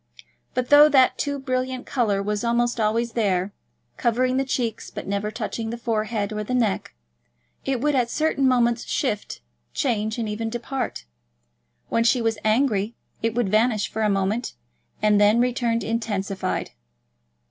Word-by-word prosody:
But, 250 0 -1
though 295 +1 +8
that 265 -3 +4
too 285 0 -1
brilliant 255 -1 -2
colour 210 -6 0
was 210 +1 -2
almost 235 0 +1
always 230 +2 +1
there, 200 -4 0 0.4
covering 255 +2 +1
the 270 - +2
cheeks 245 -4 -2
but - - -7
never 200 +1 -2
touching 225 0 -4
the 235 - -4
forehead 215 -2 -2
or 210 0 -3
the 255 +4 -2
neck, 215 - 0 0.7
it 270 -2 0
would 295 +1 +2
at 250 -3 +1
certain 290 -1 +1
moments 240 -2 +2
shift, 210 -7 -2 0.3
change, 220 -5 0
and 230 -2 -2
even 220 +2 -3
depart. 245 - -4 0.8
When 230 - +2
she 240 +2 +3
was 225 -2 0
angry, 220 -1 +1 0.3
it 225 0 -1
would 240 -5 +1
vanish 215 0 +2
for 220 - -3
a 215 - +2
moment 200 +4 -1 0.5
and 210 -1 +4
then 210 +3 +5
return 240 -1 +1
intensified. 200 -4 -2
230 Hz, 155 wpm, -24 LUFS, 210-250 Hz, 0.8 s, though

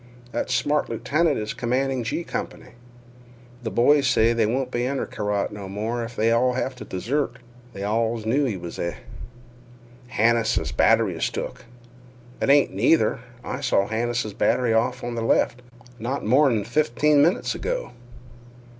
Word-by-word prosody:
That 120 - -2
smart 150 0 +1
lieutenant 150 +7 +1
is 110 0 -3
commanding 130 +2 -1
'G' 120 +9 -2
Company. - - -6 0.9
Th' 110 - -3
boys 140 +4 +4
say 115 +1 +3
they 115 -2 +2
won't 125 +3 -1
be 120 0 -1
under 135 0 -2
Carrott 105 -1 -2
no 100 -2 -8
more 110 +4 -3
if 115 +1 -7
they 110 +2 +2
all 125 +2 +3
have 130 +1 -2
t' 125 - -9
desert. 120 +7 -2 0.4
They 100 - -6
allus 110 +1 -1
knew 135 +6 +2
he 110 -7 -2
was 85 -1 -8
a—" 85 0 -2 1.2
"Hannises' 115 0 +2
batt'ry - - +3
is - - 0
took." - - -6 0.8
"It - - +1
ain't 140 0 +5
either. 155 +5 +3 0.2
I 125 - -5
saw 100 -7 +2
Hannises' 115 0 -2
batt'ry 115 +3 +1
off 125 +3 0
on 120 0 -3
th' 115 - -2
left 120 +1 +1 0.4
not 130 +5 -3
more'n 125 -2 +3
fifteen 145 +4 +2
minutes 170 +5 +2
ago." - - -3
120 Hz, 155 wpm, -24 LUFS, 110-135 Hz, 1.2 s, ain't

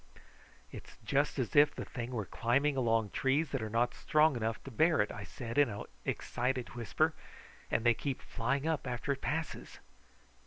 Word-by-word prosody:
"It's - - -11
just 145 +2 +1
as 130 -5 -2
if 145 +1 +6
the - - -5
thing 120 -1 -5
were 115 -5 -3
climbing 140 +9 +1
along 115 -5 +1
trees 140 +3 +1
that 135 - -1
are 110 - -3
not 115 +3 +1
strong 155 -1 +3
enough 115 -1 -1
to 135 - -8
bear 160 +6 +3
it," 105 - +2
I 105 - -7
said 115 +4 -4
in 145 -4 +5
an 100 -1 -5 0.2
excited 125 0 -1
whisper, 120 -4 +1 0.6
"and 110 - +1
they 120 - +6
keep 135 +3 -3
flying 135 +5 -1
up 160 -4 -1
after 125 +3 -2
it 140 - -2
passes." 160 +2 -3
125 Hz, 185 wpm, -33 LUFS, 115-145 Hz, 0.6 s, if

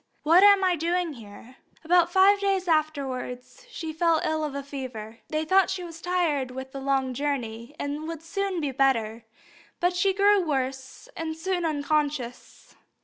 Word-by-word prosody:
What 335 +5 +6
am 400 -1 +7
I 365 -1 +3
doing 340 0 -1
here?" 230 +2 -13 0.3
About 345 +1 +3
five 390 +2 +5
days 390 -2 0
afterwards 280 - -2
she 325 -9 -6
fell 330 0 +2
ill 315 0 0
of 295 -2 -4
a 280 - -4
fever. 250 -6 -7
They 310 0 -2
thought 380 +3 +4
she 380 -1 -3
was 330 -1 -9
tired 335 -7 0
with 265 +1 -8
the 275 - -6
long 270 -1 0
journey, 245 -2 -3
and 290 +2 -4
would 325 -1 -6
soon 390 +1 -2
be 290 -4 -2
better; 235 -4 0 0.5
but 355 +1 +1
she 385 +2 +2
grew 405 0 +4
worse, 265 - -3
and 325 - -4
was 315 0 -7
soon 365 -2 -1
unconscious. 290 -4 -2
310 Hz, 170 wpm, -26 LUFS, 265-355 Hz, 0.5 s, am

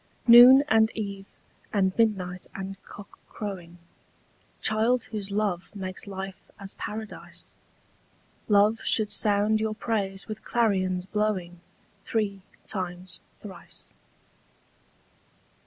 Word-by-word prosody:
Noon 245 +3 +10
and 220 -2 +4
eve 200 -2 -5 0.4
and 190 -2 +1
midnight 190 -6 0
and 195 0 -6
cock 205 0 -13
crowing, 180 -5 -7 0.8
Child 225 +3 +1
whose 210 -3 -5
love 200 -2 -2
makes 185 0 -5
life 195 -1 -7
as 195 -1 -9
paradise, 215 0 -7 0.9
Love 210 +2 +4
should 215 -2 +2
sound 210 +1 +2
your 220 -1 -1
praise 195 -4 -2
with 215 -1 -7
clarions 185 -6 0
blowing 190 -4 -2 0.4
Three 200 -3 -2 0.2
times 180 -2 -3 0.2
thrice. 200 -3 -11
200 Hz, 100 wpm, -26 LUFS, 190-220 Hz, 0.9 s, Noon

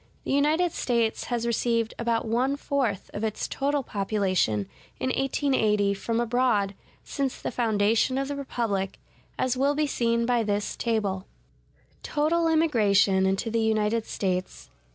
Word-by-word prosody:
The - - -3
United 305 +5 +2
States 235 -6 0
has 240 -1 -2
received 230 -1 0
about 235 -1 0
one 250 +5 +1
fourth 265 -9 -2
of 205 - -4
its 215 -1 -2
total 280 0 -1
population 190 - 0 0.3
in 260 - -1
1880 225 -7 +1
from 230 +4 -2
abroad 235 -4 +1 0.3
since 275 -3 -3
the - - -4
foundation 225 +2 +1
of 275 0 -1
the 285 - -3
republic, 225 -8 -2 0.4
as 255 -1 0
will 280 +3 +2
be 305 +1 +1
seen 235 -4 0
by 240 -1 +2
this 205 -1 -1
table: 205 -5 -1 0.7
Total 330 +3 +1
Immigration 205 -12 +3
Into 195 +4 -1
The 230 0 +1
United 220 0 +1
States. 185 -2 -3
230 Hz, 140 wpm, -26 LUFS, 205-270 Hz, 0.7 s, Immigration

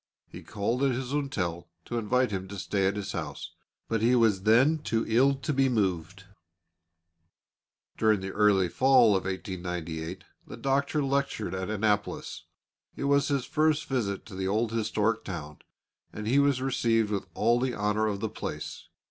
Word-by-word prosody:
He - - -10
called 110 +5 -2
at 135 -2 +2
his 125 +1 -4
hotel 95 - -2 0.2
to 120 - -2
invite 125 +2 +1
him 95 -1 -3
to 100 +1 -8
stay 95 0 0
at 100 - 0
his 100 -1 -4
house, - - -5 0.4
but 115 -1 -1
he 120 +3 +4
was 110 -5 +3
then 125 +10 +4
too 115 -6 -1
ill 130 +5 +4
to 140 +3 -3
be 135 0 +3
moved. 95 -5 -1 1.8
During 110 -2 +3
the 95 0 -5
early 100 -3 +3
Fall 125 +1 +5
of 95 - -1
1898 90 -2 -5 0.2
the - - -9
Doctor 140 +2 0
lectured 140 -7 -1
at 95 0 -3
Annapolis. 105 -1 -1 0.5
It - - -5
was 140 0 +3
his 140 -3 0
first 155 +2 +1
visit 105 -7 -2
to 110 - -12
the 95 0 -3
old 110 +3 0
historic 110 0 0
town, 75 -6 -7 0.5
and 105 - -7
he 130 +5 +4
was 140 -2 +2
received 115 -5 +1
with 100 -2 -2
all 120 +2 +3
the 125 -1 -1
honour 105 +1 0
of 100 -2 -3
the 110 - -1
place. 110 - -6
110 Hz, 170 wpm, -28 LUFS, 95-130 Hz, 1.8 s, Fall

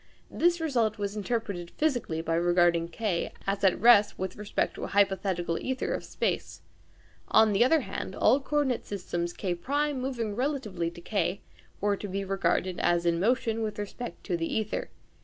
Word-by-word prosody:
This 345 0 +2
result 235 -9 +1
was 205 0 -3
interpreted 205 -5 -3
physically 245 - 0
by 165 - -1
regarding 175 0 +3
K 180 0 -2
as 195 0 -1
at 190 -2 +4
rest 210 -3 +6
with 190 0 -4
respect 210 0 -1
to - - -8
a - - -4
hypothetical 190 -4 +1
ćther 260 0 -2
of - - -5
space. - - -2 0.7
On 220 -1 +5
the 200 - +5
other 315 +5 +4
hand, - - -5
all 270 - +4
coordinate 280 -3 0
systems 175 -3 -3
K1 270 +13 -1
moving 245 -5 -3
relatively 235 - -1
to 170 - -10
K 200 0 -1 0.4
were 205 0 +1
to 205 - -6
be 195 +1 -3
regarded 185 -1 0
as 175 0 +2
in 170 -1 +2
motion 225 +2 +1
with 215 -1 -3
respect 210 +4 -6
to 180 - -1
the 165 -1 -2
ćther. 215 -1 -2
205 Hz, 170 wpm, -28 LUFS, 175-240 Hz, 0.7 s, rest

